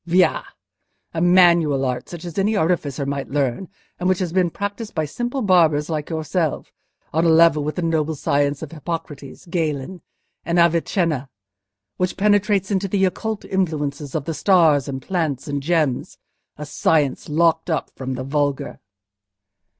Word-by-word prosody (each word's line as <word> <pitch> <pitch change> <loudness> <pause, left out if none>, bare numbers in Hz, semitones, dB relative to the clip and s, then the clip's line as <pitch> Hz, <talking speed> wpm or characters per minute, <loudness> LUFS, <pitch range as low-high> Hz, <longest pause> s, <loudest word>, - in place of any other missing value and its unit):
Via! 180 +2 +3 0.7
A 165 - -2
manual 170 -6 +4
art, 125 -1 -3
such 175 -1 -8
as 170 +1 -4
any 210 +3 +1
artificer 155 -6 0
might 140 0 -3
learn, 140 +4 -1 0.3
and 180 +1 0
which 185 - +2
has 175 -3 -3
been 180 -2 +2
practised 205 +5 -5
by 155 -2 0
simple 240 - -3
barbers 165 -5 +3
like 150 -2 -3
yourself—on 160 0 -3
a 170 - +4
level 160 -2 +5
with 150 +1 -3
the 180 - -2
noble 160 -1 0
science 145 +1 0
of 155 - -7
Hippocrates, 150 -3 -7
Galen, 165 0 -3 0.4
and 170 +2 -1
Avicenna, 170 -4 +1 0.7
which 180 0 -1
penetrates 205 -1 +2
into 195 0 0
the 195 0 +2
occult 215 +3 -3
influences 150 -6 -2
of 150 -3 -2
the 165 - -2
stars 160 -6 +3
and 135 -2 -5
plants 160 -8 -2
and 145 -1 -2
gems!—a 150 -1 -3
science 150 -1 0
locked 165 +2 +2
up 160 - -2
from 130 -1 -4
the 130 - -4
vulgar!" 145 0 -2
160 Hz, 150 wpm, -21 LUFS, 145-180 Hz, 0.7 s, level